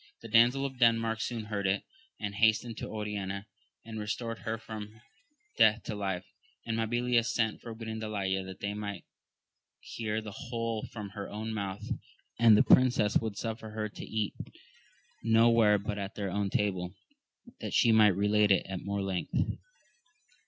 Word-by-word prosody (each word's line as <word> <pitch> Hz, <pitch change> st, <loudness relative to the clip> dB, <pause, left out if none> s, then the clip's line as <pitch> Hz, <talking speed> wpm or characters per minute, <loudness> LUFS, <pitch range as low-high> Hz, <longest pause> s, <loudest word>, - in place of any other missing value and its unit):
The 115 Hz, -, -8 dB
damsel 120 Hz, +5 st, +5 dB
of 130 Hz, -2 st, -5 dB
Denmark 115 Hz, -2 st, +3 dB
soon 115 Hz, -1 st, -3 dB
heard 105 Hz, -2 st, -2 dB
it, 95 Hz, +1 st, +1 dB, 0.4 s
and 105 Hz, -1 st, -3 dB
hastened 110 Hz, +2 st, +2 dB
to -, -, -5 dB
Oriana, 105 Hz, -2 st, -4 dB, 0.4 s
and 110 Hz, -1 st, -6 dB
restored 115 Hz, +2 st, -3 dB
her 110 Hz, 0 st, -3 dB
from 110 Hz, -1 st, -8 dB, 0.6 s
death 110 Hz, -1 st, +5 dB
to -, -, -4 dB
life; 95 Hz, -3 st, -3 dB, 0.4 s
and 115 Hz, -, -1 dB
Mabilia 120 Hz, +1 st, +2 dB
sent 115 Hz, -1 st, 0 dB
for 115 Hz, -1 st, -7 dB
Grindalaya 110 Hz, -4 st, -2 dB
that 95 Hz, 0 st, -9 dB
they 100 Hz, 0 st, -2 dB
might 105 Hz, -1 st, -5 dB, 0.8 s
hear 110 Hz, -1 st, -3 dB
the 110 Hz, -1 st, -7 dB
whole 115 Hz, -2 st, -3 dB
from 105 Hz, -3 st, -6 dB
her 100 Hz, 0 st, -7 dB
own 110 Hz, +2 st, -4 dB
mouth, 100 Hz, -1 st, -4 dB, 0.5 s
and 115 Hz, -2 st, +7 dB
the -, -, +6 dB
princesses 125 Hz, -5 st, +5 dB
would 110 Hz, -3 st, -4 dB
suffer 110 Hz, -1 st, -4 dB
her 110 Hz, 0 st, -3 dB
to -, -, -9 dB
eat 110 Hz, -2 st, -2 dB, 0.9 s
no 115 Hz, +1 st, +5 dB
where 110 Hz, -3 st, +5 dB
but 105 Hz, +1 st, -4 dB
at 100 Hz, +1 st, -5 dB
their 100 Hz, -2 st, -3 dB
own 100 Hz, +1 st, 0 dB
table, 95 Hz, -3 st, -1 dB, 0.6 s
that -, -, -4 dB
she 115 Hz, -, +5 dB
might 110 Hz, -1 st, +7 dB
relate 105 Hz, +1 st, +3 dB
it 95 Hz, -2 st, +4 dB, 0.2 s
more 100 Hz, 0 st, -2 dB
at -, -, -2 dB
length. 95 Hz, -2 st, -1 dB
110 Hz, 165 wpm, -30 LUFS, 100-115 Hz, 0.9 s, and